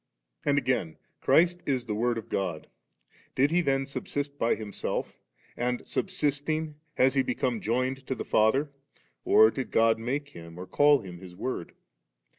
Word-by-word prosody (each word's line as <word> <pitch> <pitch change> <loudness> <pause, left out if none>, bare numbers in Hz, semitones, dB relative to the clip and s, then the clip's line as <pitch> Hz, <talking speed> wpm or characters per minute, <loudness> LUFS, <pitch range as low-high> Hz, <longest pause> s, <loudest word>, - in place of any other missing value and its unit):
And 145 -1 +2
again, 125 - 0 0.2
C3irist 175 +1 +4
is 130 -4 0
the 110 - -3
Word 120 +2 0
of 115 - -6
God 90 -5 -2 0.7
Did 140 +3 +3
He 175 +1 +3
then 135 -4 +1
subsist 140 +1 -4
by 115 - +2
Himself 105 -3 -4 0.4
and 125 0 -2
subsisting, 155 -3 -1 0.2
has 130 +1 +4
He 135 - +3
become 125 -2 -1
joined 130 +4 -1
to 130 - -1
the - - -5
Father, 135 +7 +2 0.5
or 110 +1 +7
did 130 +1 -4
God 115 0 +3
make 140 +5 -3
Him 85 -8 -11
or 90 - -6
call 145 +5 +4
Him 90 -4 -9
His 90 -1 -11
Word 100 -3 -4
130 Hz, 160 wpm, -28 LUFS, 110-145 Hz, 0.7 s, or